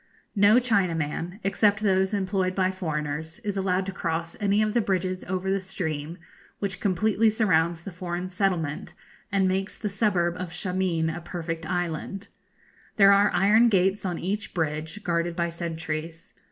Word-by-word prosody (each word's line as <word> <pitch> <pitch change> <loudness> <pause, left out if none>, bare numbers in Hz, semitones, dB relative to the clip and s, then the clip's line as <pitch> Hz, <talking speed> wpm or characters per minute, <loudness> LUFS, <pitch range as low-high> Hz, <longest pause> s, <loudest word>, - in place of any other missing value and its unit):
No 205 +2 +6
Chinaman, 180 -5 0
except 205 +1 +2
those 190 -2 +2
employed 190 -2 0
by 185 -1 +2
foreigners, 160 -3 -4
is 205 -2 -2
allowed 190 -1 0
to 195 - -3
cross 165 -2 -3
any 205 0 +2
of 215 0 0
the 240 - +3
bridges 185 -2 -1
over 185 +1 -2
the 195 - +1
stream, 170 -4 -4 0.4
which 195 -2 -3
completely 215 +3 +2
surrounds 170 -6 +1
the 195 - -6
foreign 180 0 -4
settlement, 180 -6 -1 0.4
and 195 -1 +3
makes 190 +1 -1
the 210 - -3
suburb 190 -4 +1
of 180 -1 -4
Shameen 180 -3 0
a 175 - -6
perfect 165 -2 -5
island. 175 +3 -3 0.7
There 200 -2 +7
are 200 +1 +5
iron 210 +6 +5
gates 195 0 +2
on 180 -3 -2
each 205 +4 -3
bridge, 160 +4 -2
guarded 170 0 0
by 170 0 0
sentries. 165 -1 -5
185 Hz, 155 wpm, -26 LUFS, 170-200 Hz, 0.7 s, There